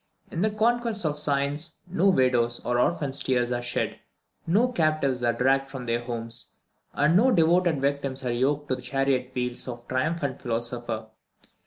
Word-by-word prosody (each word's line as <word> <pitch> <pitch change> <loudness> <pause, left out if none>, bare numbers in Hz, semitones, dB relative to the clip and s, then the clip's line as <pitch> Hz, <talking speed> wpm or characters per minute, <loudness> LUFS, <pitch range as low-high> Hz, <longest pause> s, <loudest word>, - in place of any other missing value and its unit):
In 165 - -3
the 215 - +3
conquests 225 -1 +1
of 150 -1 +1
science 145 +2 0
no 185 +2 +2
widow's 125 -7 +2
or 120 0 +1
orphan's 140 0 +2
tears 125 -2 0
are 120 0 -1
shed, 120 0 -2 0.5
no 210 +9 +3
captives 155 - 0
are 120 -1 +2
dragged 135 +3 +1
from 130 -3 -7
their 120 0 -1
homes, 115 -1 -5 0.4
and 150 +4 +2
no 235 +8 +5
devoted 170 - +3
victims 140 -1 -2
are 125 - 0
yoked 140 +4 0
to 130 - +1
the 125 - -9
chariot 130 0 0
wheels 125 0 -1
of 120 -1 -6
the 120 - -31
triumphant 140 0 -1
philosopher. 120 -1 -3
135 Hz, 170 wpm, -26 LUFS, 125-160 Hz, 0.5 s, no